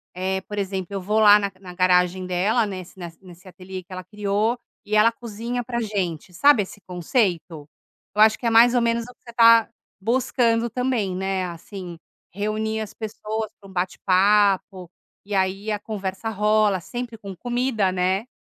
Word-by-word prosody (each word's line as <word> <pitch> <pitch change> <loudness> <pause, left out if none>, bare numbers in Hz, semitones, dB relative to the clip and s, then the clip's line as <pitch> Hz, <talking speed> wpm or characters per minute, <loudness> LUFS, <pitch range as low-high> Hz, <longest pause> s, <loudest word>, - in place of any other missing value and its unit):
eh, 190 +1 -2
por 205 +2 -8
exemplo, 190 -2 -3
eu 200 -1 -4
vou 210 +4 0
lá 210 -1 +8
na 200 -1 -2
na 180 -1 -10
garagem 180 0 +2
dela, 200 +6 +1
nessa 185 -3 -7
nesse 170 +2 -10
nesse 180 +1 -15
ateliê 185 0 -9
que 180 - -13
ela 185 0 -6
criou, 210 +3 -1 0.3
e 215 0 -2
ela 215 +2 +5
cozinha 235 +1 -5
pra 235 0 -3
gente, 185 -5 -3
sabe 245 +3 +5
esse 205 +2 -12
conceito? 175 - -2 0.5
Eu 210 - +3
acho 220 0 +5
que - - -8
é - - +4
mais 235 +2 +6
ou 245 - +3
menos 230 0 +1
o 250 +2 -12
que - - -58
você 235 - -12
tá 230 -1 +6 0.3
buscando 235 0 +1
também, 235 -5 -1
né, 190 0 -1
assim, 175 0 -8 0.4
reunir 215 +2 -2
as 215 - -6
pessoas 220 0 -5
pra 195 - -15
um - - -13
bate-papo, 190 0 +2 0.3
e 205 0 -4
aí 195 +3 0
a 210 - 0
conversa 200 -1 -5
rola, 210 -2 +2
sempre 240 +5 -6
com 195 -3 -8
comida, 240 -2 0
né? 190 +4 0
205 Hz, 180 wpm, -23 LUFS, 185-225 Hz, 0.5 s, lá